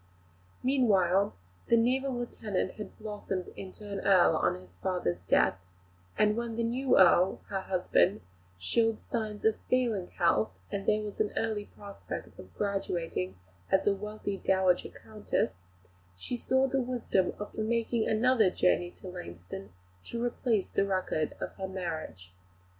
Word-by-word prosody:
Meanwhile, 200 - +3 0.3
the 235 - +5
naval 260 +4 +2
lieutenant 215 -6 -2
had 210 - -9
blossomed 205 -4 -4
into 195 +2 -9
an 200 -1 -4
Earl, 185 -4 +5
on 90 - +2
his 90 0 -17
father's 175 - -1
death; 90 0 +2 0.6
and 210 0 +4
when 235 -1 -3
the 235 - 0
new 250 +4 +2
Earl, 185 0 +5
her 195 -2 -1
husband, 190 +1 +2 0.4
showed 225 - +1
signs 215 -3 -4
of 220 -1 +3
failing 235 -8 +1
health, 170 - +2 0.2
and 200 0 -3
there 215 0 +3
was 210 -1 -7
an 210 -1 +1
early 215 -2 -1
prospect 200 -1 -9
of - - -11
graduating 170 - -2 0.3
as 190 - +3
a 205 - +4
wealthy 205 0 -4
dowager 190 -2 +2
Countess, 210 - -3 0.6
she 245 - -4
saw 260 +2 +2
the 270 0 +1
wisdom 240 -7 0
of 210 - -7
making 230 +1 0
another 225 -2 +4
journey 180 -1 +2
to 185 - -12
Lainston 95 - -8 0.4
to 235 0 -3
replace 230 -4 0
the - - +2
record 185 -5 0
of - - -4
her 190 -1 -3
marriage. 160 - -5
200 Hz, 145 wpm, -30 LUFS, 180-225 Hz, 0.6 s, the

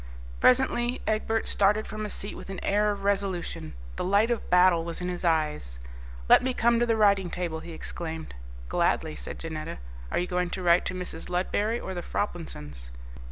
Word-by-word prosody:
Presently 250 -1 +3
Egbert 220 +1 0
started 210 +2 +3
from 215 0 -5
his 210 - -4
seat 200 - -5
with - - -10
an 195 -2 -5
air 210 +1 +2
of 200 -1 -3
resolution. 195 - -2 0.2
The - - -1
light 205 +5 +3
of 235 - -2
battle 180 -2 +5
was 170 0 -5
in 180 0 -3
his 180 0 -4
eyes. 150 - 0 0.5
"Let - - +8
me 255 0 -1
come 235 0 +3
to 240 - +2
the 225 -1 +2
writing 200 -4 +4
table," 170 -2 -3
he 170 - -9
exclaimed. 160 0 -6 0.3
"Gladly," - - +1
said - - -7
Janetta. 160 - -5 0.3
"Are - - 0
you 175 - +1
going 180 0 -1
to 185 - -4
write 170 0 +4
to 185 - -2
Mrs. 180 -2 -5
Ludberry 205 +5 0
or 190 - -5
the 175 - -4
Froplinsons?" 75 - -4
185 Hz, 190 wpm, -27 LUFS, 170-210 Hz, 0.5 s, Let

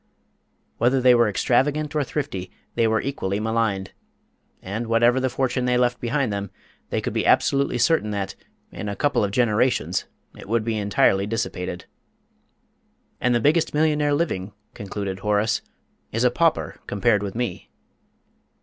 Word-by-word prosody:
Whether 125 +3 +3
they 125 0 +6
were 120 -2 +4
extravagant 145 +8 +1
or 150 - +2
thrifty, 135 -10 -4 0.2
they 115 - +2
were 110 0 +1
equally 100 -8 -2
maligned, 110 -3 -1 0.7
and, 110 +5 -4
whatever 120 +2 +3
the 130 0 0
fortune 130 0 -1
they 125 0 +2
left 125 0 +1
behind 125 -1 0
them, 100 -1 -3 0.4
they - - -1
could - - -3
be - - 0
absolutely 140 -2 +3
certain 120 -2 +2
that, 100 -2 -3 0.4
in 105 - -5
a 100 - -3
couple 145 -3 +1
of 100 - 0
generations, 120 +3 +1 0.3
it - - -12
would 115 -1 +1
be 115 -1 -1
entirely 100 -1 +2
dissipated. 90 -5 -3 1.3
"And 125 -1 +2
the - - +3
biggest 150 +5 +2
millionaire 150 -1 +2
living," 105 - -2 0.2
concluded 100 -1 -5
Horace, 105 +2 +1 0.5
"is 115 +2 0
a 125 - +4
pauper 160 +5 0
compared 105 +1 +2
with 100 0 -5
me!" 120 0 -4
115 Hz, 150 wpm, -23 LUFS, 105-130 Hz, 1.3 s, they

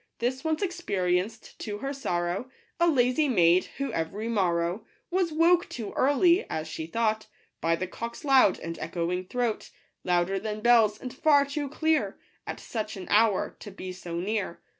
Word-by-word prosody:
This 255 +2 -2
once 320 +3 0
experienced, 210 - -2
to 205 -1 -4
her 275 +6 -4
sorrow, 180 -2 -2 0.3
A 340 - +4
lazy 270 0 +3
maid, 180 -5 +4
who 275 -4 -3
every 180 +7 -3
morrow 180 -2 0 0.3
Was 360 -2 +1
woke 335 +3 +3
too 220 -4 -6
early, 340 +8 +4
as 155 0 -3
she 160 0 -5
thought, 220 +3 0 0.3
By 165 0 +2
the 175 +3 -3
cock's 235 - -7
loud 265 -8 +5
and 165 0 -6
echoing 175 +3 -2
throat; 240 -2 -2 0.3
Louder 180 +2 +1
than 215 +1 -4
bells, 225 -3 +5
and 250 - -7
far 285 0 +4
too 285 0 -3
clear, 305 -9 0 0.3
At - - -5
such 215 -2 -5
an 185 - -7
hour, 215 -1 +3
to - - -9
be 185 -1 -7
so 180 -2 -7
near. 200 -1 -2
220 Hz, 165 wpm, -27 LUFS, 180-275 Hz, 0.3 s, loud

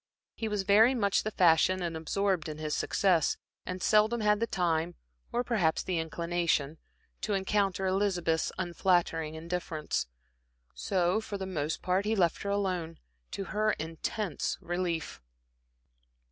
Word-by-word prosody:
He 225 - -4
was 210 -2 -1
very 220 +6 +5
much 200 -5 +2
the 215 - -2
fashion 180 -1 +3
and 170 -1 -3
absorbed 175 +1 -1
in 150 - -6
his 155 -1 -3
success, 180 -5 +2 0.3
and 185 0 -4
seldom 215 +2 +3
had 210 -1 +3
the 230 - 0
time, 175 -4 0 0.4
or 245 - 0
perhaps 195 -11 +1
the 180 -3 -1
inclination, 165 -2 -1 0.4
to 210 - -1
encounter 195 -1 0
Elizabeth's 185 -4 +1
unflattering 170 -3 0
indifference. 165 - -3 0.7
So 185 +2 0
for 205 -2 -5
the 190 - -4
most 160 -5 -3
part 185 +2 +1
he 220 +1 +1
left 175 -5 +2
her 200 - -3
alone, 185 -5 -1 0.3
to 195 - -4
her 215 0 +2
intense 165 +5 -3
relief. 175 - -3
185 Hz, 140 wpm, -30 LUFS, 165-200 Hz, 0.7 s, very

